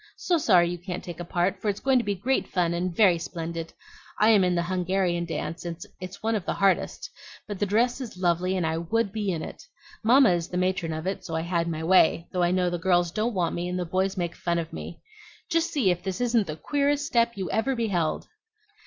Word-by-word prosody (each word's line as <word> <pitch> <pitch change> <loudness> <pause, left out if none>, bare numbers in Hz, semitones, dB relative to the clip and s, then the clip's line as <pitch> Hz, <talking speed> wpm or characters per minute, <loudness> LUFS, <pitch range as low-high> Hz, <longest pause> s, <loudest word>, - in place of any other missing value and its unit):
So 345 -2 +1
sorry 180 - +5
you 175 0 -4
can't 180 0 -6
take 175 -2 -8
a - - -3
part, 180 +2 -1
for 215 - 0
it's 200 0 -2
going 265 -1 +3
to - - -1
be 205 -2 -1
great 250 +8 0
fun 175 -2 0
and 180 +1 -1
very 180 -2 +4
splendid. 165 -1 -5 0.5
I 215 - +5
am 210 -4 +6
in 180 -1 +2
the 170 - +1
Hungarian 180 -1 0
dance, 165 0 -4
and 170 -1 -5 0.2
it's 185 +3 -9
one 225 +1 +1
of 210 -4 -1
the - - -2
hardest; 195 -1 +1 0.4
but 205 -3 -5
the 205 - +1
dress 240 +6 +1
is 235 -7 -7
lovely, 180 +1 +1
and 175 - 0
I 160 0 -1
would 205 +5 0
be 210 -1 -2
in 160 -3 -3
it. - - -8 0.4
Mamma 250 +1 +6
is 170 -1 0
the 180 - -4
matron 180 -2 0
of 160 +1 -4
it; 190 +1 -3
so 165 - -5
I 160 - 0
had 170 0 -1
my 160 -1 -3
way, 170 -1 +4
though 180 - -1
I 175 - +3
know 180 0 +1
the 175 - -2
girls 175 -1 +2
don't 215 +4 -1
want 175 -3 0
me, 175 +1 -3
and 180 - -2
the 180 - -2
boys 190 +3 -1
make 175 -2 -2
fun 170 -1 -1
of 165 -1 -4
me. - - -8 0.5
Just 335 0 +1
see 240 -11 +2
if 175 0 -2
this 190 -1 -4
isn't 235 -4 +2
the 155 - -4
queerest 285 - 0
step 235 -5 +2
you 190 -2 -3
ever 260 +4 +1
beheld!" 195 -9 -1
185 Hz, 245 wpm, -26 LUFS, 170-215 Hz, 0.5 s, am